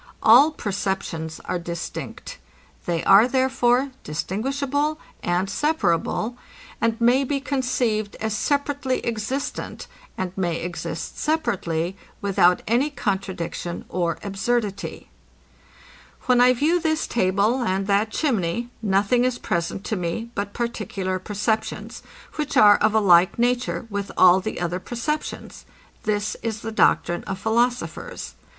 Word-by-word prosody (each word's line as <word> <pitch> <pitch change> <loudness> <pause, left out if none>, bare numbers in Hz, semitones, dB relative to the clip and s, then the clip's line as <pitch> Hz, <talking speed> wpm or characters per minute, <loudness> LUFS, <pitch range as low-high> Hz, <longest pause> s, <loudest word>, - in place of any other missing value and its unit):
All 250 +7 +8
perceptions 190 - -3
are 180 - -2
distinct. 170 0 -6 0.5
They 170 -2 0
are, 200 +4 +7
therefore, 260 0 +2
distinguishable, 275 - -1 0.2
and 175 +2 0
separable, 230 - 0 0.4
and 230 0 +1
may 245 +3 +4
be 275 +1 -1
conceived 245 -6 -1
as 220 -1 -2
separately 285 +1 -1
existent, 235 +5 -3 0.3
and 185 -1 -3
may 175 -3 -1
exist 175 +1 -5
separately, 185 - -1 0.2
without 180 -3 +3
any 245 +7 +2
contradiction 190 - -3
or 170 -2 -1
absurdity. 205 - -2 1.1
When 250 -1 +4
I 250 +1 +6
view 310 +8 +2
this 315 -1 0
table 205 +4 +1
and 195 -4 0
that 205 +2 +2
chimney, 235 - -1
nothing 205 +4 +2
is 250 -1 +1
present 170 +1 -2
to 220 - -2
me 185 +6 -3
but 200 -1 -3
particular 205 -5 -3
perceptions, 215 +3 -2 0.4
which 300 -1 -1
are 205 -1 +8
of 215 0 +2
a - - +6
like 180 -3 +5
nature 245 0 0
with 200 0 -3
all 185 0 +7
the 185 - -4
other 175 +1 -2
perceptions. 250 +9 -4 0.4
This 210 0 0
is 220 -2 -3
the 225 - -4
doctrine 175 -5 +2
of 190 - -4
philosophers. 235 +4 -1
215 Hz, 125 wpm, -23 LUFS, 185-250 Hz, 1.1 s, All